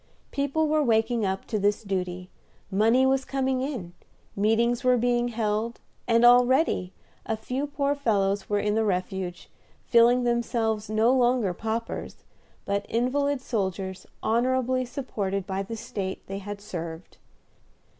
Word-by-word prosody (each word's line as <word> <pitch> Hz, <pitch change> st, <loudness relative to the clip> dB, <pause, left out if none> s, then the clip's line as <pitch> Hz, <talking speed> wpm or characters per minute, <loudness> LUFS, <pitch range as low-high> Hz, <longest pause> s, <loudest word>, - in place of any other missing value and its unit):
People 285 Hz, +3 st, 0 dB
were 305 Hz, 0 st, +2 dB
waking 225 Hz, -3 st, +2 dB
up 190 Hz, 0 st, -3 dB
to 215 Hz, -, -2 dB
this 205 Hz, +2 st, +1 dB
duty, 185 Hz, -2 st, -3 dB, 0.4 s
money 225 Hz, +6 st, +4 dB
was 265 Hz, 0 st, +2 dB
coming 265 Hz, -1 st, -1 dB
in, 245 Hz, -, -4 dB, 0.4 s
meetings 230 Hz, +4 st, +2 dB
were 250 Hz, -1 st, +4 dB
being 240 Hz, 0 st, +1 dB
held, 225 Hz, 0 st, -2 dB, 0.3 s
and 230 Hz, 0 st, +4 dB
already 245 Hz, -, +4 dB, 0.3 s
a 220 Hz, -, -2 dB
few 255 Hz, +6 st, -3 dB
poor 285 Hz, -1 st, 0 dB
fellows 205 Hz, -8 st, 0 dB
were 205 Hz, -, +2 dB
in 210 Hz, 0 st, 0 dB
the 220 Hz, +1 st, +2 dB
refuge, 185 Hz, -2 st, -2 dB, 0.4 s
feeling 240 Hz, +1 st, +5 dB
themselves 230 Hz, -3 st, 0 dB
no 220 Hz, +3 st, +3 dB
longer 245 Hz, -6 st, +2 dB
paupers, 225 Hz, +4 st, -4 dB, 0.4 s
but 200 Hz, 0 st, -1 dB
invalid 270 Hz, +4 st, 0 dB
soldiers 190 Hz, -5 st, -3 dB, 0.2 s
honorably 255 Hz, +2 st, +1 dB
supported 200 Hz, -7 st, -3 dB
by 190 Hz, 0 st, -2 dB
the 225 Hz, +4 st, -6 dB
State 195 Hz, -3 st, -5 dB
they 195 Hz, +1 st, -5 dB
had 205 Hz, +1 st, -7 dB
served. 170 Hz, -4 st, -7 dB
225 Hz, 135 wpm, -26 LUFS, 200-250 Hz, 0.4 s, feeling